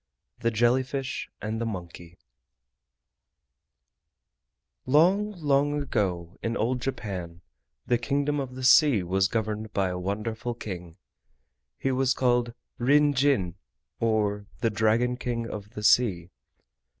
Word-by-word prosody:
THE 115 Hz, -1 st, +1 dB
JELLY 120 Hz, +3 st, +3 dB
FISH 135 Hz, 0 st, -4 dB
AND 110 Hz, +1 st, -3 dB
THE -, -, -1 dB
MONKEY 85 Hz, -3 st, -8 dB, 2.7 s
Long, 185 Hz, +10 st, +4 dB
long 145 Hz, -3 st, +1 dB
ago, 90 Hz, -, -2 dB
in 115 Hz, +1 st, -2 dB
old 125 Hz, +3 st, 0 dB
Japan, 95 Hz, -10 st, -5 dB, 0.4 s
the 120 Hz, -1 st, +1 dB
Kingdom 145 Hz, +3 st, 0 dB
of 130 Hz, -2 st, -5 dB
the 130 Hz, -, -6 dB
Sea 130 Hz, -, +6 dB
was 95 Hz, +2 st, +2 dB
governed 110 Hz, 0 st, -3 dB
by 95 Hz, -2 st, +1 dB
a 90 Hz, 0 st, -4 dB
wonderful 110 Hz, +5 st, -3 dB
King. 90 Hz, -6 st, -7 dB, 0.8 s
He 135 Hz, -, -1 dB
was 130 Hz, 0 st, +1 dB
called 120 Hz, -2 st, +1 dB, 0.2 s
Rin 145 Hz, +4 st, +4 dB
Jin, 125 Hz, -11 st, +1 dB, 0.4 s
or 105 Hz, -3 st, 0 dB
the 115 Hz, -, +2 dB
Dragon 115 Hz, +4 st, +2 dB
King 120 Hz, -2 st, -3 dB
of 105 Hz, -2 st, -7 dB
the 105 Hz, -, -6 dB
Sea. 95 Hz, -7 st, +3 dB
115 Hz, 125 wpm, -27 LUFS, 100-130 Hz, 2.7 s, Sea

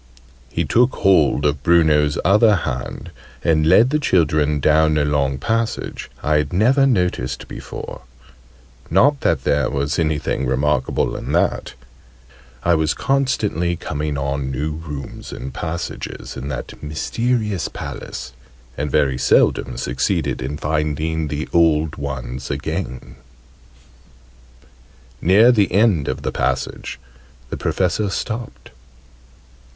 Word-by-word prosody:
He -, -, -1 dB
took 125 Hz, +2 st, +3 dB
hold 80 Hz, -7 st, +3 dB
of 75 Hz, -1 st, +1 dB
Bruno's 75 Hz, -2 st, +3 dB
other 105 Hz, +3 st, +5 dB
hand; 85 Hz, -, -4 dB, 0.3 s
and 80 Hz, -2 st, +2 dB
led 115 Hz, +10 st, +5 dB
the 150 Hz, -, +2 dB
children 75 Hz, -, +2 dB
down 75 Hz, +1 st, +3 dB
a 75 Hz, -, +2 dB
long 70 Hz, -2 st, 0 dB
passage 115 Hz, +10 st, -2 dB
I 75 Hz, 0 st, +3 dB
had 75 Hz, -2 st, -1 dB
never 130 Hz, +9 st, +4 dB
noticed 90 Hz, -, -1 dB
before -, -, -8 dB, 0.9 s
not 145 Hz, +1 st, +4 dB
that 70 Hz, -6 st, +1 dB
there 75 Hz, 0 st, +1 dB
was 70 Hz, +3 st, -1 dB
anything 75 Hz, -4 st, 0 dB
remarkable 65 Hz, +1 st, 0 dB
in -, -, -4 dB
that: -, -, 0 dB, 0.9 s
I 85 Hz, -, +3 dB
was 80 Hz, -1 st, +1 dB
constantly 110 Hz, -, 0 dB
coming 75 Hz, -2 st, -3 dB
on 70 Hz, -1 st, -2 dB
new 70 Hz, +4 st, -2 dB
rooms 75 Hz, -3 st, -7 dB
and 65 Hz, +1 st, -7 dB
passages 85 Hz, 0 st, -5 dB
in 65 Hz, 0 st, -6 dB
that 75 Hz, -, -6 dB
mysterious 105 Hz, +5 st, -1 dB
Palace, 65 Hz, 0 st, -7 dB, 0.4 s
and 75 Hz, +2 st, -2 dB
very 65 Hz, -3 st, +1 dB
seldom -, -, +2 dB
succeeded -, -, -1 dB
in 70 Hz, +4 st, -4 dB
finding 75 Hz, +1 st, -1 dB
the 75 Hz, +2 st, -3 dB
old 80 Hz, -2 st, +3 dB
ones 65 Hz, -2 st, -5 dB
again. 65 Hz, -, -4 dB, 2.0 s
Near 105 Hz, +8 st, +6 dB
the 105 Hz, -6 st, +2 dB
end 95 Hz, -6 st, +3 dB
of -, -, -3 dB
the -, -, -1 dB
passage -, -, -2 dB, 0.5 s
the -, -, -3 dB
Professor 95 Hz, +3 st, 0 dB
stopped. 110 Hz, -, -5 dB
75 Hz, 120 wpm, -20 LUFS, 70-95 Hz, 2.0 s, Near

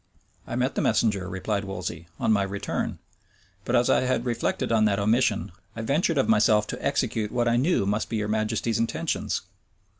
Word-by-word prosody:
"I -, -, -4 dB
met 125 Hz, +2 st, 0 dB
the -, -, -1 dB
messenger," 100 Hz, -5 st, +1 dB
replied 100 Hz, +2 st, -2 dB
Wolsey, 90 Hz, -3 st, -5 dB
"on -, -, +2 dB
my 105 Hz, -2 st, +3 dB
return: 100 Hz, 0 st, -3 dB, 0.7 s
but 120 Hz, -, 0 dB
as 120 Hz, 0 st, +4 dB
I -, -, +4 dB
had 130 Hz, -2 st, 0 dB
reflected 120 Hz, -1 st, -1 dB
on 110 Hz, -1 st, +4 dB
that 100 Hz, -2 st, +2 dB
omission, 110 Hz, 0 st, +1 dB, 0.2 s
I 115 Hz, -, -4 dB
ventured 150 Hz, +6 st, +1 dB
of 135 Hz, -, +2 dB
myself 105 Hz, -1 st, +4 dB
to -, -, -5 dB
execute 105 Hz, -2 st, 0 dB
what 120 Hz, -1 st, 0 dB
I 120 Hz, -, +3 dB
knew 140 Hz, -, +2 dB
must 105 Hz, +2 st, -1 dB
be 115 Hz, -, -2 dB
your 105 Hz, 0 st, -1 dB
majesty's 110 Hz, +1 st, 0 dB
intentions." 115 Hz, -, -1 dB
110 Hz, 185 wpm, -26 LUFS, 100-120 Hz, 0.7 s, as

